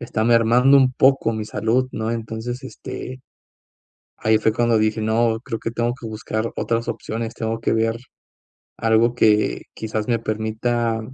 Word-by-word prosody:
está 115 -3 -2
mermando 120 +4 +5
un 130 -1 +4
poco 130 -3 +3
mi 110 -1 -3
salud, 115 +5 0
¿no?, 110 +1 -2
entonces, 115 +3 -4
este, 130 0 -8 1.0
ahí 110 0 +3
fue 110 0 +2
cuando 115 -1 +2
dije: 110 +1 +1
"No, 110 +1 +1
creo 115 -3 -4
que 115 - -4
tengo 120 +1 -1
que 120 -3 -9
buscar 110 +1 -3
otras 115 0 -1
opciones, 115 0 -4
tengo 115 0 -3
que - - 0
ver 115 0 +1 0.8
algo 115 +1 +3
que, 105 -3 +2
quizás 110 0 -4
me 115 -2 +1
permita, 110 +1 -1
115 Hz, 155 wpm, -21 LUFS, 110-120 Hz, 1.0 s, mermando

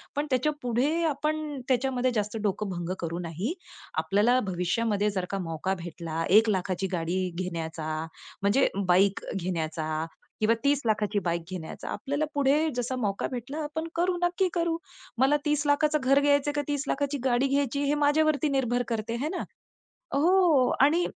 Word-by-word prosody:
पण 290 +1 -1
त्याच्यापुढे 280 +3 +1
आपण 300 0 -2
त्याच्यामध्ये 255 0 +1
जास्त 210 +1 -1
डोकं 205 0 -1
भंग 175 0 -3
करू 170 0 -3
नाही. 180 - -3 0.5
आपल्याला 220 +6 +3
भविष्यामध्ये 205 +4 0
जर 185 -2 -2
का 195 - -1
मौका 165 +4 -1
भेटला 165 -1 -4 0.2
1,00,000ची 190 -3 0
गाडी 180 +2 -1
घेण्याचा 165 -3 -4 0.5
म्हणजे 210 +7 +4 0.2
बाईक 190 +2 +3
घेण्याचा 160 -3 -2 0.4
किंवा 215 +1 +4
30,00,000ची 220 -7 +1
बाईक 170 -3 -1
घेण्याचा, 175 -4 -6
आपल्याला 285 +2 -2
पुढे 285 +3 +3
जसा 245 +1 -1
मौका 205 -5 -1
भेटला 250 +4 -5
आपण 320 +2 -4
करू 355 +2 +1
नक्की 355 +2 +2
करू. 335 -1 0 0.4
मला 270 +3 +4
30,00,000चं 295 +1 +2
घर 275 +2 +5
घ्यायचं 285 0 +3
का 290 - +1
30,00,000ची 285 0 -1
गाडी 255 +1 +3
घ्यायची? 280 0 0
हे 285 - +2
माझ्यावरती 305 0 +3
निर्भर 245 -3 +1
करते. 225 -1 -2
आहे 265 +6 -2
ना? 360 - -3 0.7
हो 325 -3 +4 0.2
आणि 320 +5 +4
250 Hz, 140 wpm, -27 LUFS, 190-290 Hz, 0.7 s, घर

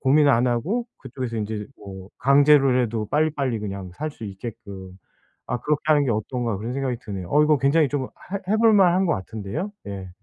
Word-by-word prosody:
고민 145 +2 +4
안 125 -1 +4
하고 175 - -1
그쪽에서 125 -2 -6
인제 105 -1 -3
뭐 95 -1 -10
강제로라도 135 -5 +4
빨리빨리 145 -6 0
그냥 100 -3 -6
살 155 +8 -4
수 120 -6 -10
있게끔 95 -2 -8 0.5
아 125 - -2
'그렇게 150 +2 0
하는 150 -2 +4
게 - - +1
어떤가.' 115 0 -2
그런 115 +5 -5
생각이 130 -2 -2
드네요. 95 -4 -6
어 150 +1 +5
이거 150 -1 +3
굉장히 140 +3 +3
좀 140 -3 -1
해 195 +7 -6
해 215 - +4
볼 225 0 +5
만한 190 -2 +4
것 165 - +2
같은데요? 110 - -5
예. 100 -2 -6
125 Hz, 375 characters per minute, -23 LUFS, 105-150 Hz, 0.5 s, 어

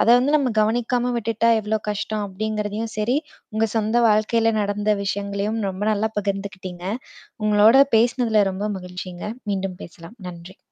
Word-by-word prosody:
அத - - +1
வந்து 275 +4 +1
நம்ம 275 -4 +1
கவனிக்காம 240 +3 +1
விட்டுட்டா 230 0 0
எவ்வளோ 215 +1 -1
கஷ்டம் 210 +1 -2
அப்படிங்கிறதையும் 215 +2 -3
சேரி, 220 +5 +1 0.4
உங்க 220 +1 +2
சொந்த 220 +2 +1
வாழ்க்கையில 225 +2 +3
நடந்த 205 +1 0
விஷயங்களையும் 200 +2 -2
ரொம்ப 190 +2 -7
நல்லா 215 +1 0
பகிர்ந்துக்கிட்டீங்க. 195 -3 -4 0.6
உங்களோட 215 +4 +6 0.2
பேசினதுல 230 -2 +3
ரொம்ப 195 +3 -3
மகிழ்ச்சிங்க. 180 0 -7 0.2
மீண்டும் 190 -2 -2
பேசலாம். 170 +5 -12
நன்றி. 175 +2 -11
210 Hz, 135 wpm, -22 LUFS, 195-225 Hz, 0.6 s, உங்களோட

